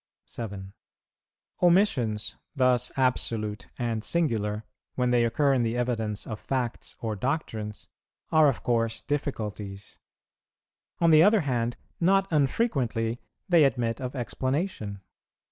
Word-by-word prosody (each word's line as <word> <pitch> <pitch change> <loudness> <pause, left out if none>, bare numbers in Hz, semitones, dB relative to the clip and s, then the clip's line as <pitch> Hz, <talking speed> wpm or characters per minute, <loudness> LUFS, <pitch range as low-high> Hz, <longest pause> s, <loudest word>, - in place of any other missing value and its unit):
7. 100 -4 -6 0.9
Omissions, 130 - +2 0.2
thus 125 -2 +3
absolute 115 -5 0
and 115 -3 -2
singular, 110 -11 0 0.3
when 125 -1 +1
they 120 -1 +4
occur 140 +4 +2
in 130 - +2
the 115 +1 0
evidence 110 -4 -1
of 110 -2 -6
facts 125 -3 -3
or 110 -2 -2
doctrines, 110 -4 -3 0.4
are 155 -1 +6
of 135 - -3
course 115 -1 0
difficulties; 105 -8 -4 1.0
on 170 -1 +4
the 155 0 +8
other 205 +3 +5
hand, 120 -5 -1 0.2
not 195 +3 +3
unfrequently 130 - 0 0.3
they 170 -4 +6
admit 120 -4 +1
of 125 +1 -4
explanation. 130 - -2
120 Hz, 115 wpm, -27 LUFS, 110-145 Hz, 1.0 s, the